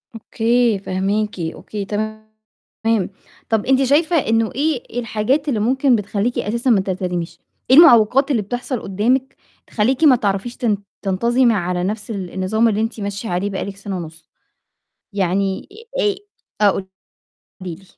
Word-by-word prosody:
أوكي، 230 -1 +1
فاهماكِ 195 +2 -2
أوكي، 195 +5 -5
تمام، 215 +1 -4 1.2
طَب 220 -1 +1
أنتِ 265 +1 +3
شايفة 310 +6 +2
إنه 225 -4 +1
إيه 270 -5 -1
الحاجات 245 +6 0
اللي 225 -5 0
ممكن 260 +3 +3
بتخلّيكِ 210 +3 -1
أساسًا 235 +5 -1
ما 205 -5 +4
تلتزميش؟ 180 -3 -3 0.3
إيه 260 - +7
المعوقات 270 -2 +6
اللي 230 -5 +2
بتحصل 245 +4 -4
قدّامِك 250 +8 0 0.3
تخلّيكِ 250 +7 0
ما 275 -5 +7
تعرفيش 205 +2 -2
تن 220 -5 +1 0.2
تنتظمي 235 +5 +2
على 180 -2 -1
نفْس 210 +3 -3
ال 190 -4 -5
النظام 220 +5 +1
اللي 215 0 +1
أنتِ 225 0 -3
ماشية 200 +2 -4
عليه 180 +3 -1
بقى 195 - -3
لِك 200 -1 -7
سنة 195 -2 -5
ونُص؟ 165 -1 -9 0.9
يعني 195 - -1 0.3
آآ 410 -4 +2 0.5
آه، 200 - +5
قولي 190 - -4 0.9
لي. 195 - -19
215 Hz, 145 wpm, -19 LUFS, 195-245 Hz, 1.2 s, إيه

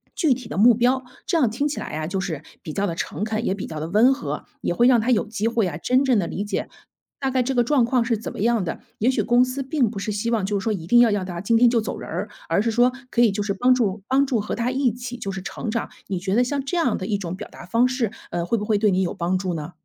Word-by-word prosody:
具 315 -7 +3
体 250 -2 -7
的 - - -6
目 235 +4 +7
标。 250 +3 +2 0.2
这 350 - +1
样 265 -8 +3
听 260 +7 -1
起 295 - -4
来 - - -5
啊， 155 0 -4
就 190 +2 -2
是 160 -6 -4 0.2
比 155 - -7
较 200 +6 -1
地 170 - -3
诚 170 +4 -4
恳， 220 +1 -2
也 - - +1
比 195 - -5
较 155 - -6
地 155 - -3
温 225 +8 +5
和， 150 - -5 0.2
也 - - 0
会 240 +7 +4
让 245 -3 +5
他 240 +4 +1
有 225 - +2
机 215 0 -2
会 230 -4 +1
啊， 165 - -4
真 255 - +2
正 255 -4 +3
地 175 - -1
理 200 - -3
解， 205 - -3 0.5
大 270 -1 -1
概 260 -1 +2
这 265 +2 -2
个 245 - +4
状 265 +1 +3
况 245 0 +2
是 230 -1 +1
怎 220 - -6
么 - - -9
样 230 0 +2
的。 165 - -4 0.2
也 230 - +3
许 260 - +1
公 240 +1 +4
司 255 +2 -4
并 265 -3 +1
不 210 - -8
是 210 - -3
希 210 +3 -2
望 225 -5 +1
就 200 0 -1
是 - - -7
说 225 - 0
一 170 -5 -5
定 240 +5 +6
要 240 -1 +6
让 205 -3 0
他 175 -2 -5
今 225 +4 +2
天 240 +1 +6
就 230 -1 +2
走 - - -4
人 - - -8
儿， - - -3 0.2
而 - - +3
是 230 - 0
说 245 +3 +4 0.2
可 240 - +1
以 235 -3 +5
就 200 +1 -2
是 200 -1 -1
帮 250 +6 +4
助 210 -5 0
帮 270 +2 +3
助 245 -4 +1
和 210 - -3
他 235 +1 -1
一 260 -1 +1
起 245 +1 -7
就 200 -4 -4
是 190 0 -5
成 215 +4 -5
长。 230 0 -2 0.2
你 190 -2 -2
觉 190 +2 -1
得 245 - +4
像 275 +2 -2
这 315 +6 -2
样 255 -10 +1
的 185 - -5
一 210 -2 0
种 180 -3 -5
表 - - -8
达 - - -11
方 230 +7 +3
式， 250 -4 -1 0.2
呃， 170 0 -2
会 230 +7 0
不 210 - -3
会 210 -1 +2
对 210 0 +3
你 185 0 +2
有 180 - -1
帮 180 +2 0
助 185 -1 -2
呢？ 155 +2 -5
225 Hz, 340 characters per minute, -23 LUFS, 195-250 Hz, 0.5 s, 目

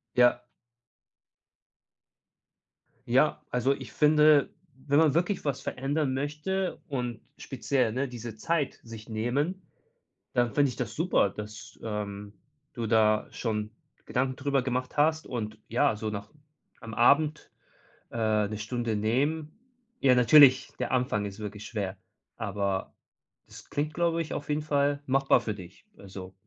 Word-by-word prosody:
Ja. 120 0 +4 2.6
Ja, 130 +5 +2
also 125 +3 +2
ich 130 -6 -10
finde, 150 -1 +5 0.4
wenn 145 0 +3
man 155 -3 +4
wirklich 175 +4 0
was 140 -3 -1
verändern 135 +1 -1
möchte 155 +7 -2
und 125 -5 -3 0.2
speziell, 125 -5 -1
ne, 130 +4 -1
diese 120 -2 -7
Zeit 155 +4 -1
sich 115 -1 -10
nehmen, 135 +12 -1 0.7
dann 120 -1 +1
finde 145 -1 +4
ich 120 - -9
das 115 -4 -4
super, 160 - +2
dass, 105 +2 -9
ähm, 105 -2 -5 0.4
du 115 -2 -4
da 110 -1 +3
schon 105 -2 -3 0.3
Gedanken 130 +1 -1
darüber 140 0 0
gemacht 125 0 -3
hast 155 +2 +2
und 110 -3 -4
ja, 125 -1 +2
so 110 0 -3
noch 105 0 -7 0.5
am 115 -2 -8
Abend, 145 +7 +3 0.6
äh, 110 -2 +1
'ne 105 +1 -5
Stunde 115 +1 -2
nehmen. 145 +9 0 0.5
Ja, 130 -2 +5
natürlich, 130 +1 +7
der 125 - -2
Anfang 125 -5 0
ist 100 +1 -7
wirklich 105 0 -7
schwer, 100 -4 -4 0.4
aber 100 -2 -2 0.5
das - - -14
klingt, 150 +1 -2
glaube 170 0 +1
ich, 160 - -5
auf 145 - -5
jeden 150 +1 0
Fall 145 -1 +1
machbar 135 0 +3
für 110 - -3
dich. 95 - -13
Also 95 -1 -10
125 Hz, 140 wpm, -28 LUFS, 110-145 Hz, 2.6 s, natürlich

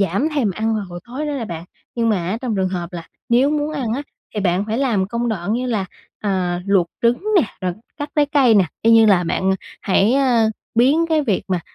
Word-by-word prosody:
giảm 200 - +1
thèm 245 -8 +1
ăn 220 +4 -1
vào 210 -2 -2
buổi 175 - -7
tối 270 +5 -4
đó 295 - -2
nè 270 -5 -3
bạn. 170 -5 -6 0.3
Nhưng 230 -1 +1
mà 215 - +3
á 215 - -2
trong 230 -5 -1
trường 190 -1 +1
hợp 180 -1 -4
là 170 -1 -7 0.2
nếu 250 +4 +4
muốn 300 0 -1
ăn 250 -7 -2
á 280 - -3 0.3
thì 210 - -1
bạn 185 +1 +1
phải 225 +3 -1
làm 220 -9 +1
công 235 +1 -2
đoạn 200 -1 -2
như 250 +2 -1
là, 215 -6 -1 0.4
ờ, 180 -3 -1
luộc 195 -4 +3 0.2
trứng 235 +7 +2
nè, - - +6 0.2
rồi 180 -1 -1 0.2
cắt 290 0 -4
trái 295 - +4
cây 275 -6 +4
nè, 195 - +5 0.2
y 230 - +4
như 225 -1 +7
là 185 -4 +4
bạn 185 +3 0 0.3
hãy, 200 +4 +3
ơ, 245 -5 +3 0.2
biến 280 +8 +4
cái 310 -2 +2
việc 215 -8 0
mà 180 -2 0
225 Hz, 240 wpm, -20 LUFS, 190-255 Hz, 0.4 s, như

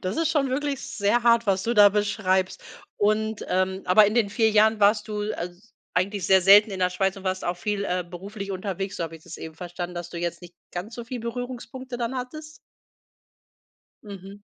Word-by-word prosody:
Das 185 +2 -3
ist 330 -1 +1
schon 290 -4 +1
wirklich 280 0 -1
sehr 205 +2 0
hart, 235 -1 +4
was 190 -1 +1
du 235 +4 -1
da 205 -2 +8
beschreibst. 200 -2 0 0.3
Und, 215 +1 0
ähm 190 +1 0
aber 205 +3 +6
in 210 - -1
den 225 -4 +2
4 220 +1 +2
Jahren 215 0 +4
warst 210 +1 +3
du 210 -1 -3
als 180 +5 -8 0.2
eigentlich 195 +2 0
sehr 190 0 +6
selten 205 +4 +7
in 190 - -5
der 180 0 +2
Schweiz 190 +1 0
und 195 - -11
warst 185 0 -2
auch 175 +1 -1
viel, 205 +2 -2
äh, 180 -2 -1
beruflich 195 +3 -7
unterwegs, 195 0 -4
so - - -3
habe 165 0 -5
ich 160 - -20
das 170 - -9
eben 160 -1 -8
verstanden, 175 0 -6
dass 175 0 -6
du 170 - -6
jetzt 170 +1 -3
nicht 175 0 -12 0.2
ganz 190 +6 -6
so 235 - -6
viel 250 +1 -6
Berührungspunkte 245 +2 -6
dann 240 +2 -3
hattest. 305 +5 -7 1.5
Mhm. 200 -1 -10
200 Hz, 205 wpm, -25 LUFS, 185-230 Hz, 1.5 s, da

